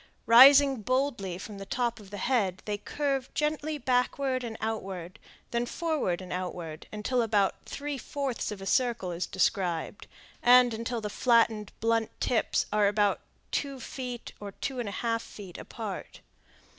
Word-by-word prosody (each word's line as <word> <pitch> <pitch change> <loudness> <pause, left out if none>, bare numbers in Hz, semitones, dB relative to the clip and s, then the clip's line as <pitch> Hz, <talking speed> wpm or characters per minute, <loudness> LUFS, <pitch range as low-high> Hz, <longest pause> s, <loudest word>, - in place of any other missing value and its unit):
Rising 270 +2 +8
boldly 240 -6 -1
from 200 +1 -8
the 195 - -7
top 240 -2 -1
of 205 -2 -13
the 205 - -7
head, 200 -5 0
they 205 -1 -2
curve 275 +2 -2
gently 305 0 -1
backward 255 0 0
and 225 -2 -5
outward, 195 -4 -4 0.3
then 235 0 0
forward 300 - -1
and 180 - -6
outward, 175 -3 -5
until 215 +4 0
about 205 -4 +1
three 285 -1 -4
fourths 275 -1 -3
of 200 -2 -6
a - - -6
circle 235 -5 +1
is 170 +1 -3
described, 185 -1 -1 0.3
and 245 -1 +6
until 230 +1 -3
the 210 - -3
flattened, 225 -4 +2
blunt 225 0 +2
tips 240 - +1
are 210 -1 +4
about 205 0 +2 0.3
two 275 -2 -2
feet 250 -1 -6
or 200 -1 -7
two 265 +4 -4
and 230 -4 -2
a 200 - -5
half 230 -1 +1
feet 195 -6 -10
apart. - - -7
230 Hz, 155 wpm, -29 LUFS, 200-255 Hz, 0.3 s, Rising